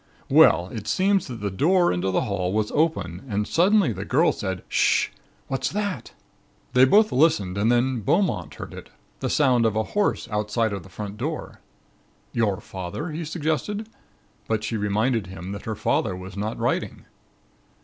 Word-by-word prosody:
"Well, 90 Hz, +2 st, +6 dB
it 105 Hz, -1 st, -7 dB
seems 195 Hz, 0 st, +2 dB
that 120 Hz, -5 st, -7 dB
the 100 Hz, -1 st, -2 dB
door 175 Hz, -, +3 dB
into 90 Hz, +2 st, -1 dB
the 95 Hz, -, +1 dB
hall 95 Hz, -3 st, -1 dB
was 105 Hz, 0 st, 0 dB
open 100 Hz, -, 0 dB
and 105 Hz, 0 st, -1 dB
suddenly 185 Hz, -, +3 dB
the -, -, -5 dB
girl -, -, +3 dB
said: -, -, -4 dB
'H'sh! -, -, +2 dB, 0.4 s
what's 135 Hz, -, -1 dB
that?' 200 Hz, -, -3 dB, 0.6 s
"They 130 Hz, 0 st, +7 dB
both 210 Hz, +10 st, +5 dB
listened 130 Hz, -, +2 dB
and 105 Hz, +4 st, +2 dB
then 120 Hz, +1 st, +2 dB
Beaumont 100 Hz, -, 0 dB
heard -, -, -8 dB
it -, -, -10 dB, 0.3 s
the -, -, -2 dB
sound 130 Hz, -5 st, +3 dB
of 110 Hz, -2 st, +1 dB
a 110 Hz, -, +1 dB
horse 205 Hz, -, +1 dB
outside 105 Hz, +1 st, 0 dB
of 100 Hz, -, -4 dB
the 95 Hz, -, -14 dB
front 100 Hz, +2 st, -7 dB
door. -, -, -5 dB, 0.7 s
"'Your 105 Hz, -5 st, +1 dB
father?' 95 Hz, -, -6 dB
he 160 Hz, +2 st, -4 dB
suggested, 165 Hz, -, -2 dB, 0.6 s
but 110 Hz, -1 st, -1 dB
she 110 Hz, +2 st, -2 dB
reminded 110 Hz, +1 st, 0 dB
him 95 Hz, 0 st, -7 dB
that 100 Hz, 0 st, -7 dB
her 110 Hz, -, -3 dB
father 100 Hz, -1 st, 0 dB
was 95 Hz, +1 st, -9 dB
not 105 Hz, +2 st, -3 dB
riding. -, -, -2 dB
110 Hz, 170 wpm, -24 LUFS, 100-155 Hz, 0.7 s, They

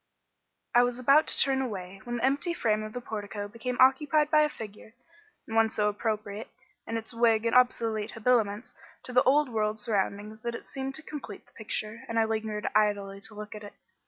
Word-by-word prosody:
I 240 Hz, -, +7 dB
was 245 Hz, 0 st, +1 dB
about 275 Hz, +5 st, +5 dB
to -, -, +3 dB
turn 270 Hz, -1 st, +3 dB
away 195 Hz, -6 st, -5 dB
when 240 Hz, 0 st, -3 dB
the 240 Hz, -, +1 dB
empty 285 Hz, +6 st, 0 dB
frame 215 Hz, -6 st, +1 dB
of 215 Hz, 0 st, -7 dB
the 245 Hz, -, -5 dB
portico 205 Hz, -2 st, -5 dB
became 235 Hz, +4 st, -5 dB
occupied 295 Hz, +3 st, +4 dB
by 305 Hz, -1 st, +6 dB
a 300 Hz, -, +3 dB
figure, 220 Hz, -2 st, -10 dB, 0.5 s
and 225 Hz, -, -6 dB
one 225 Hz, 0 st, +4 dB
so 210 Hz, -1 st, +1 dB
appropriate, 210 Hz, 0 st, -3 dB, 0.4 s
in 230 Hz, -, -2 dB
its 225 Hz, +1 st, -5 dB
wig 230 Hz, -1 st, +3 dB
and 230 Hz, -, +1 dB
obsolete 225 Hz, -4 st, +2 dB
habiliments, 225 Hz, -2 st, +1 dB, 0.3 s
to 250 Hz, -, -8 dB
the 250 Hz, -, +6 dB
old 285 Hz, +2 st, +3 dB
world 215 Hz, -2 st, -1 dB
surroundings 210 Hz, 0 st, -2 dB
that 235 Hz, 0 st, -3 dB
it -, -, -8 dB
seemed 270 Hz, 0 st, -5 dB
to 315 Hz, -, -4 dB
complete 285 Hz, -10 st, -8 dB
the -, -, -27 dB
picture, 215 Hz, 0 st, -4 dB
and 230 Hz, -, -2 dB
I 225 Hz, -, +4 dB
lingered 220 Hz, -1 st, -2 dB
idly 200 Hz, -2 st, +1 dB
to 220 Hz, 0 st, -6 dB
look 210 Hz, 0 st, -7 dB
at 210 Hz, 0 st, -9 dB
it. 205 Hz, -, -10 dB
225 Hz, 205 wpm, -28 LUFS, 210-250 Hz, 0.5 s, I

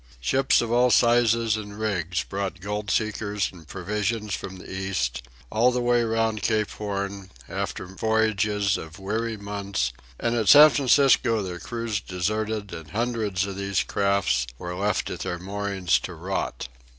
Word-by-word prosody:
Ships 135 Hz, -, +3 dB
of 115 Hz, -1 st, -3 dB
all 125 Hz, +1 st, +4 dB
sizes 115 Hz, -2 st, +4 dB
and 105 Hz, -1 st, -7 dB
rigs 90 Hz, -5 st, -1 dB
brought 95 Hz, -2 st, -4 dB
gold 105 Hz, +2 st, -4 dB
seekers 105 Hz, -2 st, -1 dB
and 85 Hz, -4 st, -14 dB
provisions 105 Hz, +3 st, -2 dB
from 95 Hz, -, -5 dB
the 90 Hz, -, -12 dB
East, 95 Hz, -11 st, -2 dB, 0.3 s
all 115 Hz, +3 st, +4 dB
the 125 Hz, -, -1 dB
way 120 Hz, -1 st, +3 dB
round 110 Hz, -1 st, 0 dB
Cape 110 Hz, -1 st, +1 dB
Horn, 100 Hz, -2 st, -4 dB, 0.2 s
after -, -, -4 dB
voyages 105 Hz, 0 st, +1 dB
of 80 Hz, +1 st, -9 dB
weary 110 Hz, +3 st, -2 dB
months, 100 Hz, -10 st, -2 dB, 0.3 s
and 115 Hz, 0 st, 0 dB
at 110 Hz, -3 st, +1 dB
San 150 Hz, +1 st, +10 dB
Francisco 130 Hz, -5 st, +4 dB
their 90 Hz, -2 st, -5 dB
crews 115 Hz, -1 st, -3 dB
deserted 105 Hz, +3 st, -2 dB
and 80 Hz, -3 st, -8 dB
hundreds 110 Hz, -2 st, -1 dB
of 100 Hz, -1 st, -5 dB
these 100 Hz, -1 st, 0 dB
craft 95 Hz, -12 st, +1 dB
were 90 Hz, +5 st, -5 dB
left 100 Hz, +2 st, -1 dB
at -, -, -5 dB
their 90 Hz, -, -3 dB
moorings 95 Hz, -1 st, 0 dB
to -, -, -7 dB
rot. -, -, -3 dB
105 Hz, 155 wpm, -25 LUFS, 95-110 Hz, 0.3 s, San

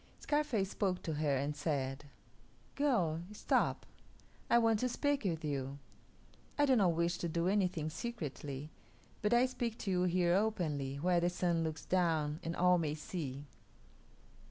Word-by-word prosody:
Scarface 265 Hz, -10 st, 0 dB
spoke 185 Hz, -3 st, -1 dB
to 160 Hz, -, -2 dB
her, 145 Hz, -2 st, +1 dB
and 145 Hz, +2 st, -2 dB
said, 140 Hz, -2 st, -2 dB, 0.7 s
"Girl, 190 Hz, -, +1 dB
stop; 210 Hz, -, 0 dB, 0.6 s
I -, -, +6 dB
want 225 Hz, -2 st, +3 dB
to 250 Hz, -, 0 dB
speak 285 Hz, 0 st, 0 dB
with 165 Hz, -4 st, -1 dB
you. 140 Hz, -1 st, -3 dB, 0.8 s
I 290 Hz, -, +5 dB
do 265 Hz, -2 st, +4 dB
not 190 Hz, -7 st, +4 dB
wish 170 Hz, +2 st, 0 dB
to 170 Hz, -, -2 dB
do 170 Hz, +2 st, 0 dB
anything 185 Hz, -6 st, +1 dB
secretly, 150 Hz, -, -5 dB, 0.5 s
but 210 Hz, -, +1 dB
I 240 Hz, +1 st, +5 dB
speak 240 Hz, -3 st, -3 dB
to 195 Hz, -, -3 dB
you 180 Hz, -1 st, +2 dB
here 175 Hz, -1 st, +2 dB
openly, 165 Hz, -10 st, 0 dB
where 175 Hz, +4 st, +2 dB
the 175 Hz, +1 st, +2 dB
Sun 175 Hz, -2 st, 0 dB
looks 160 Hz, -1 st, -4 dB
down 160 Hz, -4 st, +1 dB
and 165 Hz, +1 st, -3 dB
all 180 Hz, 0 st, +4 dB
may 150 Hz, -2 st, -1 dB
see." 145 Hz, -4 st, -5 dB
175 Hz, 155 wpm, -34 LUFS, 150-205 Hz, 0.8 s, I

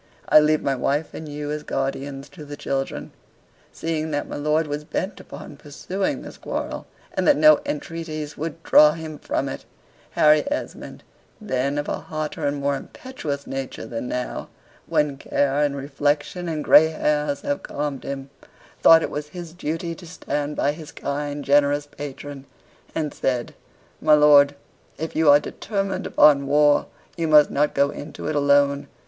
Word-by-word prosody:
I -, -, +8 dB
leave 155 Hz, 0 st, +2 dB
my 140 Hz, -, +1 dB
wife 140 Hz, +4 st, -1 dB
and 155 Hz, -1 st, -7 dB
you 145 Hz, 0 st, -5 dB
as 150 Hz, 0 st, -3 dB
guardians 135 Hz, 0 st, -3 dB
to 150 Hz, +2 st, -11 dB
the 145 Hz, 0 st, -8 dB
children." 135 Hz, -1 st, -3 dB, 0.6 s
Seeing 160 Hz, -1 st, -3 dB
that 145 Hz, -1 st, -2 dB
my -, -, -6 dB
lord 150 Hz, +2 st, +1 dB
was 145 Hz, 0 st, -4 dB
bent 190 Hz, +6 st, -4 dB
upon 145 Hz, -, -10 dB
pursuing 185 Hz, -, -3 dB
this -, -, -10 dB
quarrel, -, -, -4 dB, 0.3 s
and 185 Hz, -2 st, 0 dB
that -, -, +6 dB
no 155 Hz, 0 st, +7 dB
entreaties 155 Hz, -1 st, -5 dB
would 165 Hz, +1 st, -6 dB
draw 150 Hz, 0 st, +7 dB
him 155 Hz, -2 st, -7 dB
from -, -, -2 dB
it, -, -, -6 dB, 0.5 s
Harry 150 Hz, 0 st, +5 dB
Esmond 295 Hz, -, -5 dB, 0.4 s
(then 140 Hz, -, -1 dB
of 145 Hz, -, -2 dB
a -, -, -2 dB
hotter 155 Hz, 0 st, -4 dB
and 145 Hz, 0 st, -1 dB
more 140 Hz, 0 st, 0 dB
impetuous 145 Hz, -, -6 dB
nature 135 Hz, -1 st, -5 dB
than 115 Hz, +1 st, -5 dB
now, 125 Hz, 0 st, -4 dB, 0.4 s
when 150 Hz, -2 st, +1 dB
care, 140 Hz, +1 st, 0 dB
and 145 Hz, -1 st, +1 dB
reflection, 145 Hz, +5 st, -1 dB
and 155 Hz, -2 st, -3 dB
gray 160 Hz, -, +7 dB
hairs 150 Hz, -2 st, -1 dB
have 145 Hz, -, -2 dB
calmed 145 Hz, -2 st, -4 dB
him) 135 Hz, 0 st, -6 dB, 0.5 s
thought 165 Hz, 0 st, +7 dB
it -, -, -3 dB
was 150 Hz, 0 st, -4 dB
his 170 Hz, +1 st, -9 dB
duty 165 Hz, 0 st, -3 dB
to 175 Hz, +1 st, -12 dB
stand 150 Hz, -3 st, -3 dB
by 145 Hz, -, +1 dB
his 155 Hz, 0 st, -10 dB
kind, 145 Hz, 0 st, -4 dB
generous 145 Hz, +1 st, +3 dB
patron, 145 Hz, -1 st, -8 dB, 0.5 s
and 150 Hz, -2 st, -2 dB
said, 125 Hz, -2 st, -2 dB, 0.5 s
"My 155 Hz, -1 st, +6 dB
lord, 145 Hz, -1 st, +6 dB, 0.4 s
if 160 Hz, +1 st, -5 dB
you 160 Hz, -1 st, +4 dB
are 145 Hz, 0 st, +8 dB
determined 195 Hz, +4 st, -3 dB
upon 140 Hz, -2 st, +5 dB
war, 145 Hz, +1 st, +4 dB, 0.3 s
you 165 Hz, -1 st, -1 dB
must 150 Hz, -1 st, +6 dB
not 150 Hz, +1 st, +1 dB
go 140 Hz, +1 st, +3 dB
into 145 Hz, 0 st, -7 dB
it 155 Hz, -, -1 dB
alone. 140 Hz, 0 st, +3 dB
150 Hz, 165 wpm, -23 LUFS, 140-155 Hz, 0.6 s, I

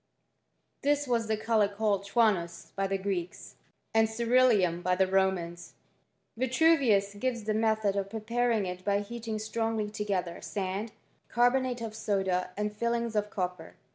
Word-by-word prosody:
Thiswas 275 Hz, -6 st, +1 dB
the 220 Hz, 0 st, 0 dB
colour 215 Hz, -1 st, +2 dB
called 200 Hz, -1 st, -1 dB
xifvoe 225 Hz, 0 st, +4 dB
(chianoi) 170 Hz, -1 st, -8 dB
by 195 Hz, 0 st, 0 dB
the 195 Hz, 0 st, 0 dB
Greeks, 190 Hz, -3 st, -4 dB, 0.4 s
and 225 Hz, 0 st, +4 dB
cmruleum 220 Hz, -6 st, +3 dB
by 180 Hz, 0 st, +1 dB
the 190 Hz, +1 st, +3 dB
Romans. 185 Hz, -3 st, -1 dB, 0.6 s
Vitru 260 Hz, +7 st, +4 dB
I 300 Hz, -, -5 dB
*ius 200 Hz, -5 st, +2 dB
gives 250 Hz, -2 st, -1 dB
the 215 Hz, +1 st, -1 dB
method 220 Hz, -2 st, +1 dB
of 195 Hz, -1 st, -2 dB
preparing 225 Hz, 0 st, 0 dB
it 180 Hz, 0 st, -6 dB
by 200 Hz, 0 st, +1 dB
heating 225 Hz, +1 st, -5 dB
I -, -, -1 dB
strongly 220 Hz, 0 st, -2 dB
together 195 Hz, -5 st, -3 dB
sand, 200 Hz, +2 st, -3 dB, 0.4 s
carbonate 245 Hz, +1 st, +2 dB
of 220 Hz, -2 st, -5 dB
soda, 190 Hz, -4 st, 0 dB
and 210 Hz, 0 st, -2 dB
tilings 235 Hz, 0 st, -1 dB
I -, -, +4 dB
of 210 Hz, 0 st, -4 dB
copper. 180 Hz, -4 st, -4 dB
210 Hz, 160 wpm, -29 LUFS, 195-230 Hz, 0.6 s, xifvoe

